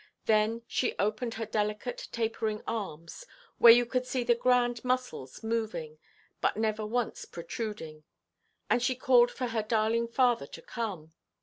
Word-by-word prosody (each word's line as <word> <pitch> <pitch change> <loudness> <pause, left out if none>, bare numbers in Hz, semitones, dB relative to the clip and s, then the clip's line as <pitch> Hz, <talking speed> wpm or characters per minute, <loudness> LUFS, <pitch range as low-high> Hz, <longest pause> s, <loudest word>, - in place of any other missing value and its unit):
Then 220 +1 +2
she 250 - -1
opened 215 +3 -1
her 225 - -3
delicate 210 +2 -2
tapering 225 -2 -2
arms, 185 - -5 0.4
where 235 - +10
you 240 +1 +6
could 250 +1 -2
see 255 -1 -1
the 240 0 +4
grand 245 -1 +2
muscles 250 - -3
moving, 215 -9 -3 0.4
but - - +1
never 215 -1 0
once 240 +1 -2
protruding, 170 -4 -6 0.6
and 245 - +2
she 255 +1 +1
called 245 -2 +5
for 250 -1 -4
her 225 -1 0
darling 225 +1 +1
father 240 - +2
to 165 - -10
come. 185 -10 -5
225 Hz, 145 wpm, -30 LUFS, 210-245 Hz, 0.6 s, where